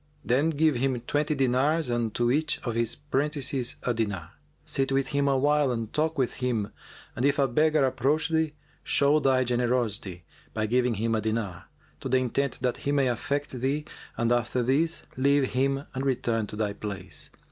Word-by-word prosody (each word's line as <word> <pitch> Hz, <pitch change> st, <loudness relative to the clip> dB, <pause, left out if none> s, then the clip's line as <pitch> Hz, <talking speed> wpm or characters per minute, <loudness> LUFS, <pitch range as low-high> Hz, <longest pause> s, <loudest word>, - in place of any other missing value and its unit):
Then 140 Hz, +6 st, +2 dB
give 155 Hz, -3 st, +2 dB
him 130 Hz, 0 st, 0 dB
twenty 150 Hz, +5 st, 0 dB
dinars 135 Hz, +4 st, +2 dB
and 120 Hz, -2 st, -1 dB
to 120 Hz, 0 st, +2 dB
each 150 Hz, +3 st, +1 dB
of 120 Hz, -, -2 dB
his 115 Hz, 0 st, 0 dB
prentices 140 Hz, -3 st, -1 dB
a 125 Hz, -, +1 dB
dinar. 105 Hz, -8 st, -3 dB, 0.3 s
Sit 135 Hz, 0 st, 0 dB
with 135 Hz, 0 st, +1 dB
him 140 Hz, -1 st, +1 dB
awhile 140 Hz, +1 st, +3 dB
and 115 Hz, -2 st, -4 dB
talk 160 Hz, +1 st, 0 dB
with 130 Hz, -3 st, +1 dB
him 115 Hz, -5 st, -1 dB, 0.4 s
and 120 Hz, -, -2 dB
if 140 Hz, +1 st, +3 dB
a 140 Hz, -1 st, +3 dB
beggar 150 Hz, +3 st, +3 dB
approach 135 Hz, +5 st, +1 dB
thee, 160 Hz, -2 st, +1 dB, 0.3 s
show 145 Hz, +2 st, +4 dB
thy 130 Hz, -3 st, +3 dB
generosity 120 Hz, -7 st, -1 dB, 0.3 s
by 110 Hz, -1 st, 0 dB
giving 125 Hz, +1 st, +1 dB
him 115 Hz, +2 st, 0 dB
a 110 Hz, -, +1 dB
dinar, 110 Hz, -5 st, -3 dB, 0.3 s
to 135 Hz, -, -5 dB
the 130 Hz, -, +4 dB
intent 130 Hz, +1 st, -1 dB
that 125 Hz, -1 st, 0 dB
he 140 Hz, -, -2 dB
may 140 Hz, -3 st, +2 dB
affect 140 Hz, +4 st, -2 dB
thee, 135 Hz, +4 st, -1 dB, 0.3 s
and 115 Hz, 0 st, +1 dB
after 120 Hz, +1 st, +1 dB
this, 155 Hz, +7 st, +1 dB
leave 140 Hz, 0 st, +3 dB
him 135 Hz, +2 st, +1 dB
and 130 Hz, -, -3 dB
return 120 Hz, -5 st, 0 dB
to -, -, -7 dB
thy 105 Hz, -1 st, -1 dB
place. 95 Hz, -5 st, -6 dB
130 Hz, 180 wpm, -27 LUFS, 120-140 Hz, 0.4 s, show